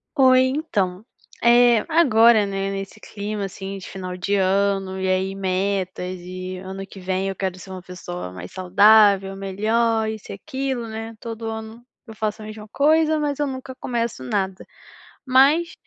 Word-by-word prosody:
Oi 260 -2 +6
então, 210 - -2 0.4
eh, 240 -1 +5
agora, 235 -9 +5
né, 195 0 -2
nesse 195 +2 -6
clima 205 -1 -5
assim 195 +1 -6
de 190 - -9
final 185 -1 -6
de 200 +3 -1
ano, 195 0 +1
e 190 - -1
aí 190 +1 0
metas 185 -1 -2
e 185 +1 -6
ano 190 +1 -7
que 195 - -12
vem 185 +1 -2
eu 195 - -4
quero 185 -1 -3
ser 190 - -12
uma 185 -1 -7
pessoa 180 - -7
mais 90 0 -9
saudável, 195 +1 +5
melhor, 220 +4 0
isso 220 -1 -7
e - - -4
aquilo, 265 +1 -4
né, 225 +1 -7
todo 225 -1 -7
ano 220 +1 -7 0.2
eu 220 - -10
faço 215 0 -3
a - - -8
mesma 215 0 -9
coisa 310 +4 +3
mas 290 -2 -1
eu 295 - +1
nunca 260 -1 -7
começo 235 - -3
nada. 190 +7 -2 0.6
Mas, 280 +6 +4
200 Hz, 165 wpm, -22 LUFS, 190-235 Hz, 0.6 s, Oi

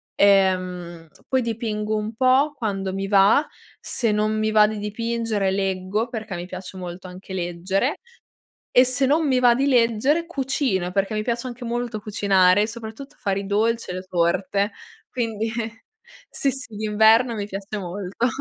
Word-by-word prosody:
Ehm, 185 -4 +2 0.2
poi 260 -1 +2
dipingo 220 -2 -2
un 215 +1 -3
po' 260 +5 +3
quando 195 -5 -2
mi 195 +1 -3
va, 200 +9 +5 0.3
se 230 -3 -1
non 215 +1 +1
mi 215 0 0
va 215 -1 +6
di 215 0 -4
dipingere 220 -1 -1
leggo, 195 +3 -1
perché 220 -5 -5
mi 175 0 -5
piace 185 +1 -8
molto 180 0 -7
anche 185 +1 -11
leggere 185 - -1 0.7
e, 250 - +6
se 255 +1 0
non 305 +4 +2
mi 260 -3 +2
va 245 -1 +6
di 270 +2 +1
leggere, 260 +5 +2
cucino 265 - -1
perché 195 +2 0
mi 215 - -1
piace 235 +2 -2
anche 245 0 -8
molto 240 -1 -3
cucinare, 200 -1 +3
soprattutto 230 +4 -9
fare 195 -1 -1
i 200 - -7
dolci 225 +2 0
e - - -3
le 185 - -5
torte 185 +3 0 0.4
quindi 225 -3 -2 0.8
sì, 275 - 0
sì 270 -3 -8
d'inverno 220 +3 +4
mi 205 -2 -3
piace 195 +1 -6
molto. 195 +4 -3
215 Hz, 160 wpm, -23 LUFS, 195-235 Hz, 0.8 s, va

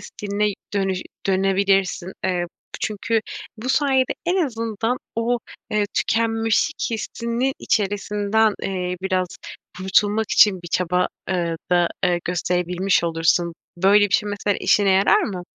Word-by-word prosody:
stiline 205 0 -2 0.2
dönü 195 -1 +1 0.3
dönebilirsin. 195 -1 +1
Eee, 180 -2 0 0.3
çünkü 215 +2 0 0.4
bu 235 +4 -6
sayede 265 -2 +2
en 360 +2 +2
azından 225 0 -2 0.2
o, 235 +1 +1 0.3
eee, 210 -1 +1
tükenmişlik 225 +6 +1
hissinin 235 +3 -2
içerisinden, 205 +1 +1
eee, 180 -2 -2
biraz 185 -1 0 0.5
kurtulmak 205 +3 +1
için 190 -4 +5
bir 175 - -8
çaba, 180 +1 +1 0.2
eee, 170 -3 -1
da, 175 -1 +4 0.2
ııı, 175 -1 +1
gösterebilmiş 180 +1 0
olursun. 170 +1 +1 0.2
Böyle 200 +3 +5
bir 190 - -1
şey 210 - +2
mesela 205 0 -1
işine 205 -2 +3
yarar 190 +1 +4
mı? 185 -3 -4
200 Hz, 125 wpm, -22 LUFS, 180-220 Hz, 0.5 s, için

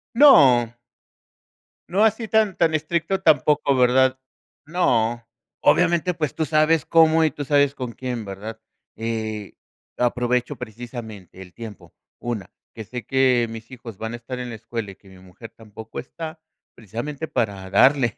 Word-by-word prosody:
No. 130 - +6 1.1
No 195 +4 +2
así, 220 +1 +1
tan 215 -3 +2
tan 165 -2 +2
estricto 170 +4 -1
tampoco, 150 -3 +3
¿verdad? 130 +1 +3 0.5
No. 120 -8 0 0.4
Obviamente, 175 +1 +3
pues 155 -4 -3
tú 160 - -1
sabes 155 +1 +2
cómo, 160 -1 +5
y 155 - +2
tú 145 - -6
sabes 145 -1 +3
con 125 -2 -5
quién, 120 -2 -5
¿verdad? 105 +3 -7 0.4
Eh, 110 -2 -4 0.4
aprovecho 125 0 0
precisamente, 110 -5 -9
el 90 -2 -12
tiempo. 110 -1 -10 0.3
1 120 -5 -4 0.2
que 110 - -6
sé 120 +1 -7
que 130 -2 +2
mis 115 +2 -10
hijos 115 -5 -10
van 110 +2 -5
a - - -3
estar 125 +2 -7
en 125 -1 -5
la 115 - -6
escuela, 115 -2 -6
y - - -14
que 95 0 -21
mi 95 - -15
mujer 95 +5 -13
tampoco 110 0 -10
está, 160 +5 -8 0.4
precisamente, 120 - -6
para 100 -9 -2
darle 130 +1 +4
125 Hz, 150 wpm, -22 LUFS, 110-155 Hz, 1.1 s, No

